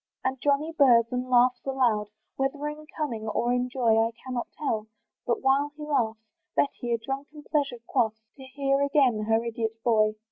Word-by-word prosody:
And 260 -1 -2
Johnny 290 +3 +1
burrs 245 -6 +6
and 250 0 -2
laughs 250 0 +4
aloud, 245 -6 +1 0.3
Whether 280 +2 -1
in 305 +1 -9
cunning 235 -8 -3
or 240 +3 0
in 250 0 0
joy, 230 -3 +3
I 225 - +1 0.2
cannot 250 -2 -3
tell; 220 -7 -2 0.4
but 240 - 0
while 280 +2 +2
he 300 - -7
laughs, 235 -7 0 0.4
Betty 245 -3 0
a 235 - +2
drunken 275 +5 -6
pleasure 280 -5 -1
quaffs, 220 -4 0
To 265 - -11
hear 275 +1 0
again 270 -7 +2
her 225 +1 +2
idiot 225 -1 -2
boy. 215 -2 +3
250 Hz, 175 wpm, -27 LUFS, 230-280 Hz, 0.4 s, burrs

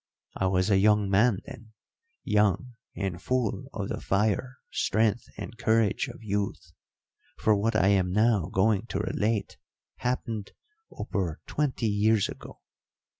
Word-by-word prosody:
I 95 - 0
was 95 +2 +1
a 95 - +5
young 105 -1 +3
man 105 0 +3
then 110 -1 -11 0.5
young 105 +4 +1 0.2
and 95 -3 -3
full 125 -2 -1
of - - -4
the - - -4
fire, 110 +6 0
strength, 110 +2 +1
and 115 - -8
courage 110 -2 +2
of - - -10
youth 100 -1 -3 0.7
for 110 - +3
what 110 +3 0
I 100 -2 +4
am 95 -3 +2
now 105 -3 +3
going 105 +3 +2
to 95 - -3
relate 105 0 -1 0.4
happened 115 -4 -3 0.4
over 90 -7 -3
twenty 145 -5 -1
years 105 0 +2
ago. - - -10
105 Hz, 135 wpm, -28 LUFS, 95-115 Hz, 0.7 s, a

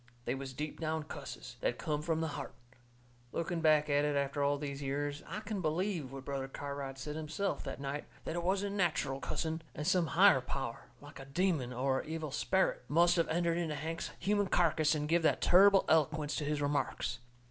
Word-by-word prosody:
They - - 0
was 135 0 -5
deep 150 +3 -5
down 160 -1 -1
cusses, 155 - -8
that - - 0
come 150 -2 -2
from 160 0 0
the 160 - -1
heart. 140 -1 -6 0.8
Looking 170 0 -2
back 155 -1 +4
at 145 0 +3
it 150 -1 +1
after 140 +1 0
all 140 0 +2
these 140 -1 -5
years, 145 +1 -2
I 195 +6 -5
can 210 -2 -3
believe 165 -3 -1
what 135 -1 -8
Brother 135 -1 -3
Cartwright 140 -1 -5
said 150 +3 -5
himself 160 +6 -2
that - - -5
night, 140 +1 -4 0.2
that - - -3
it 175 - -1
wasn't 200 +3 0
natcheral 155 -7 0
cussing 160 +5 -2
and 150 - -4
some 180 -1 +3
higher 190 -8 +7
power, 125 -2 -4 0.2
like 145 0 -12
a 135 - -8
demon 150 -3 0
or 130 +2 0
a - - -6
evil 160 -1 -4
sperrit, 190 +7 +1
must 170 +4 +4
of 165 - +2
entered 170 +1 +1
into 160 -3 -1
Hank's 160 +3 -4
human 205 +1 +1
carkis 160 -3 +3
and 150 0 -2
give 170 +2 +3
that 160 - +3
turrible 195 +2 +6
eloquence 155 -1 +2
to 150 - -2
his 145 0 -1
remarks. 145 -4 -1
155 Hz, 200 wpm, -33 LUFS, 140-170 Hz, 0.8 s, higher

